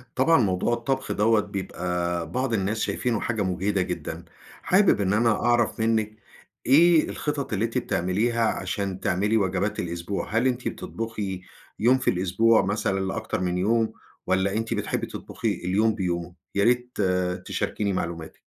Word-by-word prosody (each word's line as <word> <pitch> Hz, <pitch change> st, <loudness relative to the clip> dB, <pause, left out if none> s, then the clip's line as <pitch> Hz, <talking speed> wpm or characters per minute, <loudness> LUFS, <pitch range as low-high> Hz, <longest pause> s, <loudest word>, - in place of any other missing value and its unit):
طبعًا 160 Hz, +6 st, +4 dB
موضوع 95 Hz, +2 st, +1 dB
الطبخ 130 Hz, +3 st, -2 dB
دوَّة 110 Hz, +1 st, +3 dB
بيبقى 90 Hz, -4 st, -3 dB
بعض 130 Hz, +3 st, -1 dB
الناس 105 Hz, +1 st, 0 dB
شايفينه 115 Hz, 0 st, -1 dB
حاجة 115 Hz, -3 st, -2 dB
مُجهدة 95 Hz, +1 st, 0 dB
جدًا، 90 Hz, -1 st, -4 dB, 0.4 s
حابب 190 Hz, -, +4 dB
إن 95 Hz, 0 st, +1 dB
أنا 115 Hz, +2 st, +3 dB, 0.2 s
أعرف 120 Hz, -3 st, +2 dB
منِّك 110 Hz, -1 st, +1 dB, 0.5 s
إيه 160 Hz, +4 st, +5 dB
الخطط 145 Hz, -5 st, -3 dB
اللي 105 Hz, +2 st, +1 dB
أنتِ 115 Hz, +2 st, -3 dB
بتعمليها 115 Hz, +2 st, 0 dB
عشان 95 Hz, -1 st, -2 dB
تعملي 105 Hz, +5 st, +1 dB
وجبات 100 Hz, +1 st, 0 dB
الأسبوع، 85 Hz, +3 st, -3 dB
هل 120 Hz, +3 st, +3 dB
أنتِ 125 Hz, -1 st, -1 dB
بتطبخي 105 Hz, -5 st, -4 dB, 0.4 s
يوم 125 Hz, +4 st, +4 dB
في 130 Hz, -, 0 dB
الأسبوع 95 Hz, +4 st, +3 dB
مثلًا 95 Hz, -1 st, 0 dB
لأكتر 95 Hz, +2 st, -3 dB
من 90 Hz, -1 st, 0 dB
يوم، 110 Hz, +3 st, +1 dB, 0.3 s
والّا 95 Hz, +1 st, +1 dB
أنتِ 115 Hz, 0 st, -2 dB
بتحبي -, -, -2 dB
تطبخي -, -, -3 dB
اليوم 105 Hz, +4 st, +2 dB
بيومه؟ 90 Hz, -3 st, -3 dB, 0.2 s
يا 100 Hz, -, +3 dB
ريت 125 Hz, +2 st, +1 dB, 0.5 s
تشاركيني 100 Hz, -2 st, -2 dB
معلوماتِك. 85 Hz, -3 st, -4 dB
105 Hz, 145 wpm, -25 LUFS, 95-115 Hz, 0.5 s, إيه